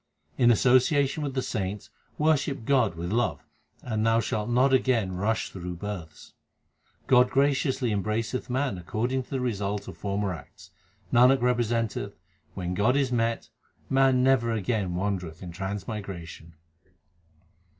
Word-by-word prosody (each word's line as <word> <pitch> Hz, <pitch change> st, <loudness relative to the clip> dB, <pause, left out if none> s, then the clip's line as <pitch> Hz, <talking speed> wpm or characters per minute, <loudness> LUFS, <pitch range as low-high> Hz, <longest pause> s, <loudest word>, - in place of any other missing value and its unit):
In 120 Hz, -2 st, +4 dB
association 130 Hz, +5 st, +3 dB
with 140 Hz, -3 st, -3 dB
the 130 Hz, -, 0 dB
saints 100 Hz, -1 st, -4 dB, 0.3 s
worship 145 Hz, -5 st, +1 dB
God 125 Hz, -9 st, +2 dB
with 85 Hz, +2 st, -4 dB
love, 105 Hz, -10 st, 0 dB, 0.4 s
and 110 Hz, -3 st, -2 dB
thou 115 Hz, 0 st, +3 dB
shalt 110 Hz, -1 st, -2 dB
not 130 Hz, +3 st, +3 dB
again 125 Hz, -7 st, +2 dB
rush 110 Hz, +4 st, -1 dB
through 90 Hz, -1 st, -6 dB
births. 85 Hz, -5 st, -8 dB, 0.7 s
God 125 Hz, -1 st, +5 dB
graciously 135 Hz, -2 st, +1 dB
embraceth 110 Hz, +5 st, -2 dB
man 130 Hz, -6 st, -1 dB
according 115 Hz, +10 st, -1 dB
to 125 Hz, -, -14 dB
the 135 Hz, -, -2 dB
result 105 Hz, -4 st, -2 dB
of -, -, -8 dB
former 100 Hz, -1 st, -2 dB
acts. 80 Hz, -5 st, -13 dB, 0.4 s
1 125 Hz, +2 st, +6 dB
Nanak 135 Hz, -1 st, +3 dB
representeth 120 Hz, -2 st, 0 dB, 0.4 s
when 90 Hz, -2 st, -3 dB
God 110 Hz, +8 st, +2 dB
is 135 Hz, -3 st, +1 dB
met, 115 Hz, -1 st, -1 dB, 0.4 s
man 135 Hz, -1 st, +4 dB
never 130 Hz, -3 st, +3 dB
again 105 Hz, -4 st, -1 dB
wandereth 90 Hz, -3 st, -3 dB
in 90 Hz, -, -7 dB
transmigration. 95 Hz, -3 st, -6 dB
115 Hz, 140 wpm, -27 LUFS, 100-130 Hz, 0.7 s, 1